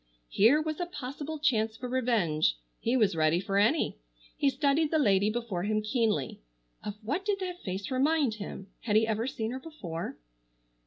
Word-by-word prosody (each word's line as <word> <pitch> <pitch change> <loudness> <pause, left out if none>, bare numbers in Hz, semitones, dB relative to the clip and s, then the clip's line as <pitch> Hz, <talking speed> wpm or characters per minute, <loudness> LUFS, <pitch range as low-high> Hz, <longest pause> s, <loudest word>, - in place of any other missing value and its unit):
Here 235 +9 +5
was 310 +1 -3
a 350 - -1
possible 290 0 -5
chance 225 -7 +1
for 250 - -5
revenge. 230 - +1 0.2
He 245 +3 +1
was 205 -6 +3
ready 155 +1 +3
for 195 +1 0
any. 230 - +2 0.4
He 280 - +3
studied 285 +3 +2
the 315 - +2
lady 205 -7 +3
before 220 -5 -2
him 215 +2 0
keenly. 215 - 0 0.4
Of 205 - -4
what 290 - -1
did 405 -1 0
that 360 -1 -4
face 190 +4 -4
remind 280 -1 +2
him? 195 -1 -6
Had 210 -3 -1
he 220 +1 +5
ever 220 +2 -1
seen 225 -4 -3
her 260 - -4
before? 205 - -6
235 Hz, 175 wpm, -29 LUFS, 205-290 Hz, 0.4 s, Here